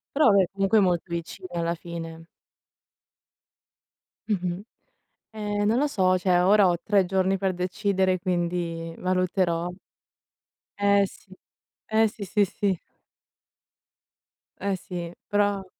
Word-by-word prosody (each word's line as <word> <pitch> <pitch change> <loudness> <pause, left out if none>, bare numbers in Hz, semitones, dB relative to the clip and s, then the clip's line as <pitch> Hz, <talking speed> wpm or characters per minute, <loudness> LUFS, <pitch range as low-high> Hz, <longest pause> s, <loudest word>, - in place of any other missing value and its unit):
Però 275 -7 +5
vabbè, 195 -1 +5
comunque 195 +2 +2
è 210 - +6
molto 180 -3 +2
vicina, 170 +2 -6
alla 170 0 0
fine. 165 -1 -8 2.0
Mh-mh. 180 -3 -1 0.7
Ehm, 205 -1 -2
non 220 +3 +3
lo 295 - +2
so, 185 -7 +2
cioè 180 -1 +2
ora 200 0 +5
ho 175 - +2
3 200 -2 +3
giorni 190 +1 +1
per 190 0 0
decidere, 185 +1 0
quindi 170 -2 -2
valuterò. 185 -2 0 1.1
Eh, 200 0 +4
sì. 190 - -16 0.5
Eh, 220 0 +3
sì, 210 0 -8
sì, 205 +2 +2
sì. 195 -1 -1 1.8
Eh, 200 0 -1
sì. 175 -2 -6 0.2
Però 205 -1 +1
185 Hz, 120 wpm, -25 LUFS, 175-200 Hz, 2.0 s, è